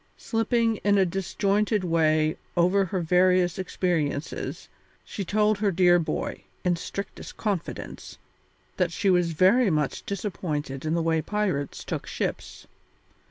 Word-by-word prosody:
Slipping 225 0 +1
in 205 0 +2
a 190 - +4
disjointed 200 +3 0
way 155 -2 +2 0.2
over 185 +3 +4
her 185 0 -2
various 180 +1 +3
experiences, 165 -5 -2 0.4
she 200 - -5
told 210 +2 +2
her 205 -1 +2
dear 175 -1 +4
boy, 165 - -3 0.2
in 180 -1 +3
strictest 200 +4 -7
confidence, 200 -6 -4 0.6
that 180 -2 +1
she 195 +2 +1
was 175 -2 +2
very 195 +8 +4
much 150 -4 -1
disappointed 155 -8 -3
in 155 +1 0
the 170 - 0
way 160 -1 +1
pirates 185 -6 -2
took - - -4
ships. - - -4
180 Hz, 130 wpm, -26 LUFS, 165-200 Hz, 0.6 s, a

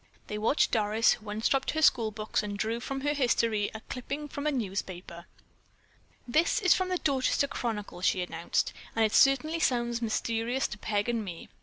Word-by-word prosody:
They 210 - -5
watched 225 +8 +2
Doris, 215 0 +3
who 215 -1 -9
unstrapped 225 +6 0
her 315 - 0
school 230 -7 +4
books 215 0 -2
and 205 -1 -5
drew 225 +3 -1
from 270 +2 -4
her 290 +1 +1
history 230 -6 +1
a 220 - -6
clipping 280 +5 -5
from 285 +1 -4
a - - +2
newspaper. 185 -7 -5 1.0
"This 310 +8 +2
is 365 -4 +5
from 370 -1 -1
the 365 - +1
Dorchester 280 -2 +1
Chronicle," 215 -9 -4
she 185 0 +2
announced, 170 -1 -1 0.2
"and 225 0 +4
it 215 - -1
certainly 280 +5 +4
sounds 240 -4 +1
mysterious 230 +3 -1
to 210 - -8
Peg 205 0 -1
and 235 -2 0
me." 175 -4 -8
230 Hz, 180 wpm, -29 LUFS, 210-270 Hz, 1.0 s, is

